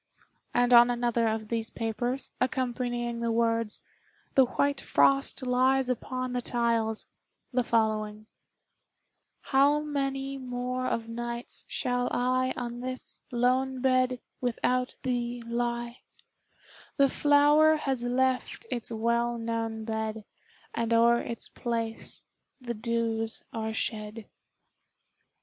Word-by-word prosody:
And 245 Hz, 0 st, +3 dB
on 240 Hz, 0 st, +9 dB
another 240 Hz, -1 st, +1 dB
of 220 Hz, -1 st, -2 dB
these 225 Hz, -1 st, -2 dB
papers, 240 Hz, +3 st, -2 dB
accompanying 245 Hz, -2 st, -1 dB
the 235 Hz, 0 st, 0 dB
words, 230 Hz, -1 st, 0 dB, 0.5 s
"The 265 Hz, -, +6 dB
white 280 Hz, +2 st, 0 dB
frost 275 Hz, -1 st, +2 dB
lies 255 Hz, +1 st, +3 dB
upon 255 Hz, +1 st, -2 dB
the 250 Hz, -, -1 dB
tiles," 230 Hz, -2 st, 0 dB, 0.5 s
the 250 Hz, 0 st, +2 dB
following: 215 Hz, -2 st, 0 dB, 1.2 s
"How 285 Hz, +2 st, +3 dB
many 275 Hz, -2 st, -2 dB
more 250 Hz, 0 st, -3 dB
of 225 Hz, -1 st, -2 dB
nights 235 Hz, +1 st, +1 dB
shall 245 Hz, 0 st, -1 dB
I 255 Hz, +1 st, +1 dB
On 240 Hz, -1 st, -4 dB
this 255 Hz, +1 st, -5 dB
lone 255 Hz, +2 st, +1 dB
bed 255 Hz, -1 st, +2 dB, 0.2 s
without 250 Hz, +1 st, 0 dB
thee 245 Hz, -1 st, -2 dB
lie; 235 Hz, +1 st, -2 dB, 1.0 s
The 275 Hz, -1 st, +6 dB
flower 295 Hz, +3 st, +5 dB
has 270 Hz, -5 st, -1 dB
left 255 Hz, -, 0 dB
its 235 Hz, -1 st, -3 dB
well 235 Hz, +1 st, 0 dB
known 225 Hz, -1 st, -3 dB
bed, 220 Hz, -1 st, -3 dB, 0.5 s
And 230 Hz, 0 st, 0 dB
o'er 235 Hz, +1 st, +5 dB
its 235 Hz, -, -5 dB
place 230 Hz, -2 st, -4 dB, 0.4 s
the 240 Hz, -2 st, -4 dB
dews 225 Hz, 0 st, -2 dB
are 220 Hz, -1 st, -2 dB
shed." 215 Hz, 0 st, -4 dB
240 Hz, 115 wpm, -28 LUFS, 230-255 Hz, 1.2 s, on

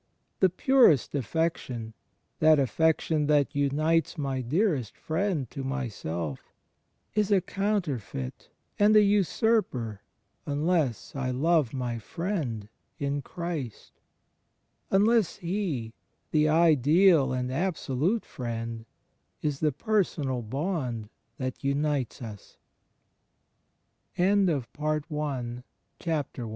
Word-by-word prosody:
The 190 Hz, -, +5 dB
purest 235 Hz, -, +4 dB
affection 130 Hz, -5 st, -2 dB, 0.2 s
— -, -, -48 dB
that 155 Hz, 0 st, +6 dB
affection 155 Hz, +2 st, +1 dB
that 145 Hz, -2 st, +3 dB
unites 155 Hz, +5 st, +1 dB
my 135 Hz, -3 st, -2 dB
dearest 140 Hz, -, 0 dB
friend 160 Hz, -4 st, -1 dB
to 135 Hz, -, -5 dB
myself 100 Hz, -, -4 dB, 0.3 s
— -, -, -47 dB
is 210 Hz, -2 st, +1 dB
a 200 Hz, -, +6 dB
counterfeit 165 Hz, -, -3 dB, 0.3 s
and 210 Hz, +1 st, +5 dB
an 210 Hz, -, +8 dB
usurper 200 Hz, -, +1 dB, 0.5 s
unless 145 Hz, -, 0 dB
I 130 Hz, -2 st, -1 dB
love 145 Hz, 0 st, +2 dB
my 120 Hz, -3 st, -3 dB
friend 150 Hz, -, -3 dB, 0.3 s
in 140 Hz, 0 st, -1 dB
Christ 165 Hz, -, -5 dB, 0.5 s
— -, -, -47 dB
unless 220 Hz, -2 st, +3 dB
He, 170 Hz, -, -3 dB, 0.4 s
the 155 Hz, 0 st, +3 dB
Ideal 160 Hz, -1 st, +5 dB
and 125 Hz, 0 st, -2 dB
Absolute 170 Hz, -, 0 dB
Friend, 115 Hz, -2 st, -5 dB, 0.6 s
is 145 Hz, -2 st, -1 dB
the 155 Hz, -1 st, +2 dB
personal 150 Hz, -, 0 dB
bond 125 Hz, -, -3 dB, 0.3 s
that 130 Hz, -1 st, -4 dB
150 Hz, 90 wpm, -28 LUFS, 125-175 Hz, 0.6 s, an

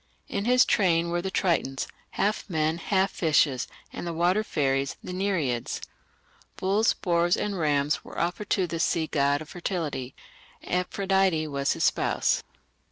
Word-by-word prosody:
In 200 Hz, -, -3 dB
his 250 Hz, +1 st, +5 dB
train 170 Hz, -4 st, +2 dB
were 175 Hz, 0 st, 0 dB
the 190 Hz, -, -3 dB
Tritons, 170 Hz, -7 st, 0 dB, 0.3 s
half 205 Hz, +2 st, 0 dB
men, 160 Hz, -1 st, 0 dB
half 190 Hz, +2 st, +1 dB
fishes, 150 Hz, -5 st, +2 dB, 0.3 s
and -, -, -5 dB
the 170 Hz, -, -2 dB
water 180 Hz, +5 st, +2 dB
fairies, 135 Hz, -6 st, 0 dB
the 180 Hz, -, -6 dB
Nereids. 170 Hz, -11 st, -1 dB, 0.8 s
Bulls, 200 Hz, +4 st, +2 dB
boars, 175 Hz, -1 st, +1 dB
and 200 Hz, -3 st, -2 dB
rams 145 Hz, -2 st, +1 dB
were -, -, -8 dB
offered 180 Hz, +5 st, -2 dB
to 190 Hz, -, +2 dB
this 165 Hz, -1 st, -1 dB
sea 165 Hz, -2 st, +1 dB
god 145 Hz, -1 st, +1 dB
of 155 Hz, -, -17 dB
fertility. 160 Hz, -8 st, -4 dB, 0.5 s
Amphitrite 180 Hz, -3 st, +1 dB
was 140 Hz, 0 st, +1 dB
his -, -, -3 dB
spouse. -, -, +2 dB
170 Hz, 150 wpm, -27 LUFS, 150-190 Hz, 0.8 s, his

